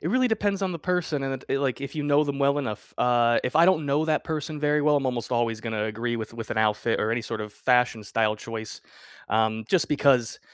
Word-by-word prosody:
it - - -3
really 255 0 +2
depends 205 -3 0
on 185 -2 0
the 165 - -5
person, 170 -5 -1
and 135 0 -2
it 130 - -8
it - - +2
it - - 0
like 135 -1 -1
if 140 - -6
you 150 - -2
know 145 +1 +3
them 140 -1 -3
well 140 +1 +2
enough 110 -7 -5
uh, 120 -1 +3
if 125 - -2
I 165 +2 +6
don't 160 -5 +3
know 145 +3 +1
that 155 -1 0
person 155 -1 -4
very 150 0 +2
well, 150 0 +3
I'm 140 - 0
almost 125 -2 -2
always 115 -2 0
gonna 110 -2 -2
agree 115 +2 -2
with 110 0 -6
with 115 -2 -7
an - - -3
outfit 110 +1 +1
or 110 - 0
any 115 +1 0
sort 110 -1 -5
of 105 -1 -8
fashion 125 -3 +1
style 110 +1 0
choice, 110 -1 -7 0.5
um, 110 0 +1
just 185 -4 +2
because 135 -5 +2
130 Hz, 255 wpm, -25 LUFS, 115-150 Hz, 0.5 s, I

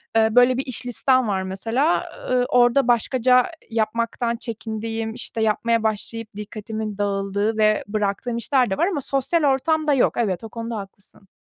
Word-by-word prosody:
eee, 220 -1 +5
böyle 245 +1 +5
bir 270 - -2
iş 255 -1 -3
listem 255 0 +2
var 190 -2 -1
mesela, 225 - 0 0.3
ııı, 250 -1 +3
orada 245 +1 +4
başkaca 250 +1 +3 0.2
yapmaktan 230 +1 -1
çekindiğim, 225 -1 -5
işte 230 -1 -4
yapmaya 225 +1 +1
başlayıp 220 +1 -2
dikkatimin 215 0 -6
dağıldığı 200 +1 -1
ve 215 -1 +3
bıraktığım 210 +3 -2
işler 255 0 +1
de 190 - -2
var 345 - +2
ama 350 -8 -2
sosyal 275 +5 0
ortamda 295 +2 +2
yok. 265 - +3
Evet, 200 -5 -1
o 225 - -7
konuda 230 0 -5
haklısın. 195 0 -12
230 Hz, 160 wpm, -22 LUFS, 215-250 Hz, 0.3 s, eee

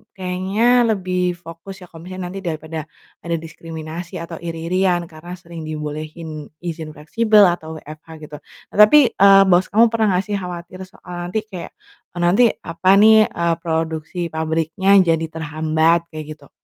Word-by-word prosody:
kayaknya 195 +7 +1
lebih 180 -1 -1
fokus 175 +3 -11
ya, - - -10
kalau 165 +2 -12
misalnya 185 -1 -6
nanti 195 - -6
daripada 160 -3 -5 0.3
ada 170 0 -3
diskriminasi 165 +1 -8
atau 165 0 -7
iri-irian 175 +2 -1
karena 175 +3 -9
sering 170 -3 -10
dibolehin 155 0 -6 0.2
izin 160 -3 -6
fleksibel 215 +7 +3
atau 160 -2 -2
WFH 155 +1 -12 0.2
gitu. 150 - -10 0.3
Nah - - -9
tapi, 235 +3 +7
eee, 195 0 +6
bos 185 -1 +3
kamu 225 +2 +4
pernah 220 -4 +1
gak 185 - 0
sih 205 -1 -2
khawatir 180 0 -8
soal 175 -2 -8
nanti 215 +4 -2
kayak, 185 -5 -8 0.4
eee, 175 - -4
nanti 185 +8 +4 0.2
apa 170 +2 -1
nih, 220 +1 +6
eee, 170 -1 -1
produksi 160 0 -3
pabriknya 160 +5 +1
jadi 165 -2 +1
terhambat 160 +1 0 0.2
kayak 155 -1 -7
gitu? 140 -2 -20
175 Hz, 155 wpm, -20 LUFS, 160-190 Hz, 0.4 s, tapi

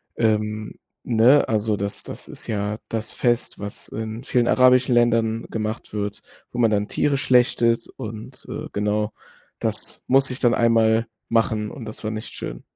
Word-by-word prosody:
ähm, 110 -1 0 0.3
ne? 120 +4 +4
Also, 110 -1 +1
das 100 0 -3
das - - -8
ist - - -8
ja 105 -1 -2
das 115 0 -3
Fest, 120 -1 0
was 100 0 -6
in 110 +2 -5
vielen 125 -3 +1
arabischen 125 0 +5
Ländern 115 -1 +2
gemacht 110 0 -4
wird, 105 -1 -3 0.3
wo 120 - -5
man 115 - +5
dann 105 -1 +1
Tiere 140 -2 +1
schlachtet 120 -2 +3
und, 110 +4 -8
äh, 155 +1 -5
genau. 105 +1 0 0.5
Das - - -2
musste 135 0 +3
ich 125 - -5
dann 120 -2 +3
1. 115 0 +3
Mal 115 0 +3 0.2
machen 110 -2 +1
und 120 - -8
das 110 - -8
war 110 - -2
nicht 110 0 -6
schön. - - -6
115 Hz, 170 wpm, -23 LUFS, 105-120 Hz, 0.5 s, arabischen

